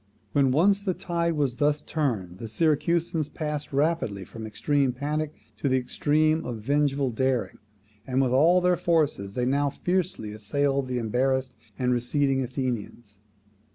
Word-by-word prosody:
When 140 Hz, -2 st, +3 dB
once 190 Hz, +9 st, +3 dB
the 190 Hz, -3 st, -1 dB
tide 170 Hz, -1 st, -1 dB
was 140 Hz, -5 st, 0 dB
thus 145 Hz, +1 st, +1 dB
turned, 105 Hz, -, -2 dB
the 115 Hz, -, -5 dB
Syracusans 160 Hz, -, +1 dB
passed 150 Hz, -2 st, -4 dB
rapidly 140 Hz, -, 0 dB
from 115 Hz, -, -10 dB
the -, -, -5 dB
extreme 140 Hz, +5 st, +1 dB
of 125 Hz, -, -3 dB
panic 150 Hz, +3 st, -2 dB, 0.3 s
to 135 Hz, -, -1 dB
the 130 Hz, -, +3 dB
extreme 155 Hz, +5 st, +1 dB
of 120 Hz, -2 st, -4 dB
vengeful 140 Hz, +3 st, +1 dB
daring, 130 Hz, +1 st, -1 dB, 0.5 s
and 130 Hz, 0 st, 0 dB
with 130 Hz, -2 st, +2 dB
all 165 Hz, +8 st, +5 dB
their 180 Hz, 0 st, +3 dB
forces 150 Hz, -, 0 dB
they 125 Hz, -, 0 dB
now 140 Hz, +2 st, +2 dB
fiercely 180 Hz, -, -2 dB
assailed 135 Hz, +6 st, -1 dB
the 125 Hz, -1 st, -2 dB
embarrassed 130 Hz, +3 st, 0 dB, 0.2 s
and 125 Hz, 0 st, +1 dB
receding 135 Hz, +3 st, +1 dB
Athenians. 120 Hz, -5 st, -4 dB
140 Hz, 155 wpm, -26 LUFS, 125-155 Hz, 0.5 s, all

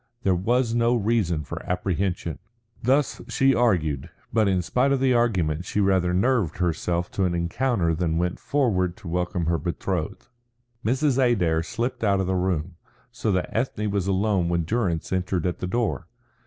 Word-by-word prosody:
There 95 Hz, -, +3 dB
was 115 Hz, +6 st, +1 dB
no 120 Hz, +1 st, +3 dB
reason 100 Hz, -8 st, +1 dB
for -, -, -6 dB
apprehension. 90 Hz, -3 st, -2 dB, 0.4 s
Thus 135 Hz, +4 st, +1 dB
she 135 Hz, 0 st, +3 dB
argued, 85 Hz, -, +1 dB, 0.2 s
but 110 Hz, -2 st, +3 dB
in 95 Hz, -2 st, +1 dB
spite 125 Hz, +9 st, +1 dB
of 140 Hz, -, +2 dB
the 130 Hz, -1 st, +3 dB
argument 90 Hz, -10 st, +1 dB
she 105 Hz, -, -2 dB
rather 95 Hz, -3 st, +2 dB
nerved 100 Hz, -, +1 dB
herself 85 Hz, 0 st, -1 dB
to 95 Hz, -, 0 dB
an 90 Hz, -1 st, 0 dB
encounter 85 Hz, +1 st, 0 dB
than 80 Hz, -1 st, 0 dB
went 90 Hz, +1 st, -1 dB
forward 95 Hz, -11 st, 0 dB
to 105 Hz, -, -11 dB
welcome 90 Hz, 0 st, -1 dB
her 85 Hz, 0 st, +1 dB
betrothed. 90 Hz, -1 st, -3 dB, 0.6 s
Mrs. 135 Hz, +3 st, +1 dB
Adair 90 Hz, -10 st, +2 dB
slipped 115 Hz, +9 st, -3 dB
out 100 Hz, -2 st, +3 dB
of 95 Hz, -, 0 dB
the 95 Hz, -, 0 dB
room, 90 Hz, -2 st, -1 dB, 0.3 s
so 115 Hz, -2 st, -1 dB
that 90 Hz, -, -2 dB
Ethne 110 Hz, -3 st, -1 dB
was 100 Hz, -2 st, -1 dB
alone 95 Hz, -2 st, +1 dB
when 85 Hz, -1 st, +1 dB
Durrance 90 Hz, -3 st, -1 dB
entered 95 Hz, -1 st, -1 dB
at 90 Hz, -, -1 dB
the 90 Hz, -, -3 dB
door. 105 Hz, -, -1 dB
95 Hz, 170 wpm, -25 LUFS, 85-115 Hz, 0.6 s, There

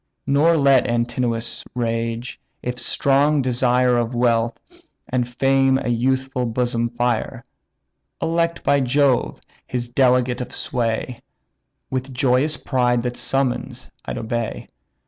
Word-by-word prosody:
Nor 150 Hz, +5 st, +3 dB
let 140 Hz, -3 st, +4 dB
Antinous 120 Hz, -1 st, -2 dB
rage, 115 Hz, 0 st, -3 dB, 0.2 s
if 125 Hz, 0 st, -3 dB
strong 140 Hz, +1 st, +2 dB
desire 125 Hz, 0 st, +2 dB
Of 120 Hz, +1 st, -1 dB
wealth 115 Hz, -1 st, +1 dB, 0.5 s
and 125 Hz, -1 st, -1 dB
fame 135 Hz, +1 st, +2 dB
a 130 Hz, -, -3 dB
youthful 130 Hz, +1 st, 0 dB
bosom 120 Hz, 0 st, -1 dB
fire: 120 Hz, -1 st, -2 dB, 0.7 s
Elect 170 Hz, 0 st, 0 dB
by 140 Hz, -, +3 dB
Jove, 135 Hz, 0 st, +1 dB, 0.3 s
his 120 Hz, -1 st, -3 dB
delegate 125 Hz, -1 st, +2 dB
of 125 Hz, -, -7 dB
sway, 115 Hz, 0 st, -2 dB, 0.7 s
With 130 Hz, +1 st, -3 dB
joyous 135 Hz, +4 st, +1 dB
pride 125 Hz, -3 st, +1 dB
the 125 Hz, -1 st, -2 dB
summons 135 Hz, 0 st, -2 dB
I'd -, -, -5 dB
obey. 115 Hz, 0 st, -4 dB
125 Hz, 115 wpm, -21 LUFS, 120-135 Hz, 0.7 s, let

